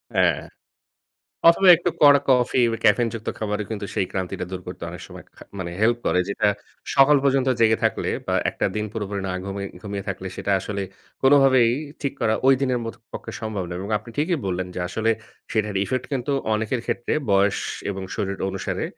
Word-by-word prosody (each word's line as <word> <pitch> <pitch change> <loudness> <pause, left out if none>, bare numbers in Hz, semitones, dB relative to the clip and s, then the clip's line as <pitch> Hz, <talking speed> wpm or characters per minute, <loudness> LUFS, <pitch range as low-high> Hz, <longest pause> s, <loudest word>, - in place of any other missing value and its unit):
হ্যাঁ। - - +3 1.1
অথবা 185 +3 +4
একটু 175 +1 -1
কড়া 145 -1 +8
কফি 125 0 +3
বা 115 - -2
ক্যাফেইন 115 +3 +4
যুক্ত 110 -1 -7
খাবার 105 -1 -2
ও - - -10
কিন্তু 105 -2 -4
সেই 95 - +1
ক্লান্তিটা 95 -1 -3
দূর 95 -1 -5
করতে - - -7
অনেক - - -9
সময় - - -11
খা - - -13 0.2
মানে 85 -2 -4
হেল্প 120 +2 +4
করে। 90 - +2
যেটা 105 - +1 0.5
সকাল 140 +1 +6
পর্যন্ত 135 -1 +2
জেগে 110 -1 +4
থাকলে - - +1 0.2
বা - - 0 0.2
একটা - - -2
দিন 105 0 -1
পুরোপুরি 100 -3 -3
না - - -2
ঘুমি 100 0 -4 0.2
ঘুমিয়ে 100 -2 -5
থাকলে, 95 0 -4
সেটা 100 - -2
আসলে 100 +1 -4 0.4
কোনভাবেই 135 -3 +5 0.3
ঠিক 140 -1 -1
করা, 110 - +2
ঐ - - +7
দিনের 130 -2 +1
মত 115 - -4 0.2
পক্ষে - - -6
সম্ভব 105 -4 -3
নয়। 85 0 -5
এবং 100 - -6
আপনি 110 +3 -13
ঠিকই 165 +3 +1
বললেন 90 0 -2
যে, - - -3
আসলে 110 +4 -1 0.4
সেটার 105 -2 -1
ইফেক্ট 130 +3 -2
কিন্তু 135 +2 -2 0.2
অনেকের 110 +3 -1
ক্ষেত্রে 120 - -1 0.2
বয়স 100 +1 +3 0.3
এবং 95 -1 -4
শরীর 100 -2 -2
অনুসারে 95 0 -3
110 Hz, 190 wpm, -23 LUFS, 100-130 Hz, 1.1 s, কড়া